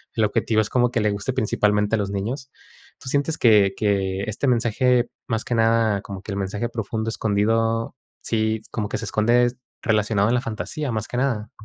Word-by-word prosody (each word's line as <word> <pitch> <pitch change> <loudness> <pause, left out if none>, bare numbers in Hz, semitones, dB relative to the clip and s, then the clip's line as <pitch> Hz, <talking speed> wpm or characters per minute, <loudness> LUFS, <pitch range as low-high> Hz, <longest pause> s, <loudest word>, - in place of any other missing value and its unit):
el 110 - +2
objetivo 110 +1 +1
es 105 - -3
como 125 -1 +2
que 120 -1 -1
le 105 -1 +2
guste 100 +5 -2
principalmente 105 -3 +1
a - - 0
los 100 -1 -2
niños. 120 +7 -4 0.5
¿Tú - - -12
sientes 145 +3 0
que 105 -4 +5
que 100 -2 0
este 110 +6 -2
mensaje, 120 +1 +2 0.2
más 115 -2 -2
que - - -2
nada, 115 -2 +2
como 100 -2 -8
que - - -7
el 100 - -3
mensaje 100 +4 -2
profundo 110 -1 -3
escondido, 115 +3 0 0.3
sí, 110 -1 0
como 105 -3 -3
que - - -2
se 115 - -5
esconde 120 +3 +3 0.3
relacionado 105 -2 +2
a - - +2
la 125 0 +2
fantasía, 115 +6 -4
más 110 -1 -2
que 125 - -5
nada? 125 -5 -1
110 Hz, 195 wpm, -23 LUFS, 105-120 Hz, 0.5 s, que